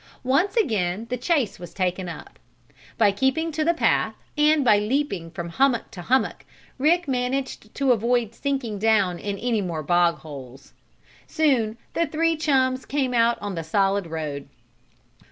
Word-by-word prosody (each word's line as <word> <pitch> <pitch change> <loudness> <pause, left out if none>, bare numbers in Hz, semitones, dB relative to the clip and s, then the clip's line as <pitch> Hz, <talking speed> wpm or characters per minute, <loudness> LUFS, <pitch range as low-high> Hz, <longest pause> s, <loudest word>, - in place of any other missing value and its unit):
Once 275 +10 +1
again 215 - 0
the - - +1
chase 250 - 0
was 175 -1 -10
taken 185 -1 -1
up. 170 - -10 0.6
By 210 -3 +4
keeping 265 +10 0
to 310 0 -1
the 340 +2 +2
path, - - +1 0.2
and 300 -1 +3
by 210 -3 +5
leaping 210 - -1
from 170 0 -6
hummock 255 +6 +1
to 180 - -8
hummock, 260 +8 0 0.4
Rick 335 +4 +3
managed 255 -3 -2
to 275 -2 +2
avoid 235 -1 +1
sinking 260 -6 -3
down 200 -5 +2
in 200 -1 -4
any 230 -1 0
more 170 -5 -3
bog 175 +2 +3
holes. 135 -3 -11 0.5
Soon 250 -8 +1 0.2
the 335 0 +1
three 330 +1 +1
chums 260 -4 +1
came 270 -3 -1
out 235 0 +3
on 205 -1 -3
the 165 -2 -4
solid 195 +3 +1
road. 150 -3 -5
230 Hz, 155 wpm, -24 LUFS, 185-275 Hz, 0.6 s, by